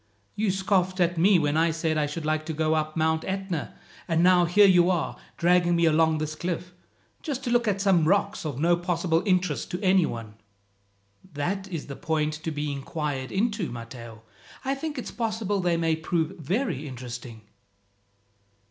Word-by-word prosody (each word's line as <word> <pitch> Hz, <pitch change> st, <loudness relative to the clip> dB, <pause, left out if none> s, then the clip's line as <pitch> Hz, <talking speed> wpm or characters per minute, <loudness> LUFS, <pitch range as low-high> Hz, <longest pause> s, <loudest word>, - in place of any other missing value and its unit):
You 210 Hz, 0 st, 0 dB
scoffed 190 Hz, -1 st, +1 dB
at 175 Hz, -1 st, +2 dB
me 190 Hz, +2 st, +5 dB
when 150 Hz, -2 st, +1 dB
I 165 Hz, +1 st, +3 dB
said 160 Hz, 0 st, -1 dB
I 150 Hz, -1 st, +1 dB
should 150 Hz, +2 st, -5 dB
like 155 Hz, 0 st, 0 dB
to 160 Hz, -, -2 dB
go 155 Hz, 0 st, +1 dB
up 155 Hz, 0 st, -1 dB
Mount 160 Hz, 0 st, +1 dB
Etna, 190 Hz, -4 st, -4 dB, 0.3 s
and 165 Hz, 0 st, +2 dB
now 180 Hz, -1 st, +5 dB
here 200 Hz, +5 st, +5 dB
you 180 Hz, -2 st, +5 dB
are, 175 Hz, -3 st, 0 dB, 0.2 s
dragging 175 Hz, 0 st, +3 dB
me 170 Hz, 0 st, +3 dB
along 160 Hz, 0 st, +3 dB
this 155 Hz, 0 st, -3 dB
cliff, 175 Hz, +2 st, -4 dB, 0.5 s
just 275 Hz, -4 st, -4 dB
to 245 Hz, -, -2 dB
look 240 Hz, -1 st, +2 dB
at 200 Hz, -2 st, +1 dB
some 190 Hz, -5 st, +3 dB
rocks 200 Hz, +3 st, +1 dB
of 145 Hz, -5 st, -4 dB
no 170 Hz, +3 st, +4 dB
possible 170 Hz, -1 st, 0 dB
interest 180 Hz, -, +1 dB
to 180 Hz, -, -4 dB
any 185 Hz, -3 st, +4 dB
one." 115 Hz, -2 st, -6 dB, 1.0 s
"That 190 Hz, +7 st, -2 dB
is 170 Hz, -5 st, -5 dB
the 140 Hz, -, -7 dB
point 155 Hz, 0 st, -1 dB
to 155 Hz, +2 st, -5 dB
be 150 Hz, -1 st, -3 dB
inquired 140 Hz, -1 st, -4 dB
into, 210 Hz, -2 st, -1 dB
Matteo. 115 Hz, -1 st, -9 dB, 0.4 s
I 270 Hz, -, +1 dB
think 295 Hz, +2 st, -5 dB
it's 250 Hz, -, -5 dB
possible 215 Hz, -3 st, -2 dB
they 175 Hz, -2 st, +1 dB
may 165 Hz, -1 st, +1 dB
prove 160 Hz, +2 st, -1 dB
very 165 Hz, -, -2 dB
interesting." 120 Hz, -3 st, -8 dB
170 Hz, 180 wpm, -26 LUFS, 155-190 Hz, 1.0 s, me